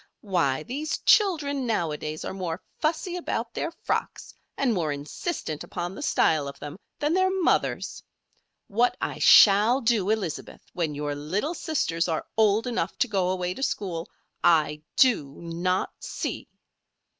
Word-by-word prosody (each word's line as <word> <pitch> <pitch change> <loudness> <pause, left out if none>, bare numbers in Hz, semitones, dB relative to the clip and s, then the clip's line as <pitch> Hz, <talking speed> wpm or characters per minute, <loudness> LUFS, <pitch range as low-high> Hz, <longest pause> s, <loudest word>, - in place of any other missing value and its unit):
Why! 160 -8 0
these 295 - -3
children 295 - +3
nowadays 155 -7 -2
are - - -4
more 180 -4 -4 0.2
fussy 340 +3 -1
about 235 -9 -3
their - - -2
frocks, 335 - -4 0.2
and 265 -4 +2
more 165 -6 0
insistent 150 - -4
upon 175 +1 -5
the - - -8
style 150 -3 +2
of 140 0 -8
them, 145 +5 -8 0.2
than 295 +2 0
their 375 +1 +3
mothers. 375 -2 0 0.7
What 235 +4 +1
I - - -3
shall 215 +5 +7
do, 225 -6 +1
Elizabeth, 205 -8 -3
when 160 -4 -2
your 145 0 -2
little 180 - -2
sisters 180 - -1
are 160 -2 -2
old 215 +1 +3
enough 230 -8 -2
to - - +2
go 190 -5 0
away 180 -1 -1
to 270 - -9
school, 180 -10 -2 0.3
I 150 -2 +3
do 150 - +3
not 175 +2 -2
see!" - - -5
195 Hz, 145 wpm, -26 LUFS, 165-260 Hz, 0.7 s, shall